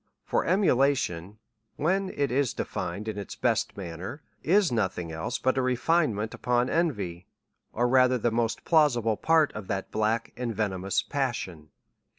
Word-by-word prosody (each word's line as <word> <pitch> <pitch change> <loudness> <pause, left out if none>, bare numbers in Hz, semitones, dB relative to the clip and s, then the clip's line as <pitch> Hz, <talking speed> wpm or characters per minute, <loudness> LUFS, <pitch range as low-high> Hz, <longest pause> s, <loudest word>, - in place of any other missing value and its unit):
For - - +1
emulation, 135 - +1 0.4
when 190 +5 0
it 140 -6 -1
is 135 -1 +1
defined 105 +2 -4
in 110 -2 -3
the 100 - -6
best - - 0
man 85 -4 -6
ner, 100 - -7 0.2
is 190 +1 +3
nothing 95 -7 -1
else 80 +10 -3
but 130 +1 +1
a - - +2
refinement 125 -4 +1
upon 125 +1 0
envy, 105 - -1 0.4
or 120 +2 +1
rather 130 0 +4
the 120 0 0
most 115 0 -1
plausible 120 -9 +3
part 160 +4 +3
of 105 -3 -7
that 95 -2 -3
black 110 +2 0
and 120 -2 -3
ve 110 - +1
nomous 95 -1 -1
passion. 105 - -3
120 Hz, 160 wpm, -27 LUFS, 100-140 Hz, 0.4 s, rather